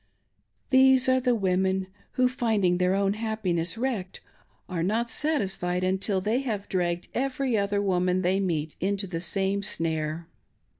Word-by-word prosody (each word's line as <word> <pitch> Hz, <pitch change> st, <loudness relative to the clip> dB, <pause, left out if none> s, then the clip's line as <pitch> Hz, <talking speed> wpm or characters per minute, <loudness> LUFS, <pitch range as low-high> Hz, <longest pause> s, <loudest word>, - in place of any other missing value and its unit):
These 260 Hz, -1 st, +5 dB
are 260 Hz, 0 st, +4 dB
the 250 Hz, -1 st, +2 dB
women 190 Hz, -1 st, +1 dB, 0.3 s
who, 255 Hz, 0 st, +3 dB
finding 215 Hz, -8 st, +1 dB
their 180 Hz, +1 st, +2 dB
own 195 Hz, 0 st, +1 dB
happiness 205 Hz, -6 st, -2 dB
wrecked, 225 Hz, -7 st, -3 dB, 0.5 s
are 180 Hz, -3 st, -3 dB
not 225 Hz, +6 st, 0 dB
satisfied 195 Hz, -, 0 dB
until 190 Hz, +1 st, 0 dB
they 215 Hz, +6 st, 0 dB
have 220 Hz, -7 st, -3 dB
dragged 175 Hz, -1 st, -1 dB
every 265 Hz, -1 st, -1 dB
other 200 Hz, 0 st, 0 dB
woman 185 Hz, -1 st, +1 dB
they 185 Hz, +2 st, +2 dB
meet 165 Hz, -5 st, -1 dB
with 190 Hz, -, +1 dB
into 200 Hz, 0 st, -1 dB
the 170 Hz, -3 st, -4 dB
same 195 Hz, +3 st, 0 dB
snare. 160 Hz, -4 st, -2 dB
195 Hz, 150 wpm, -27 LUFS, 180-225 Hz, 0.5 s, These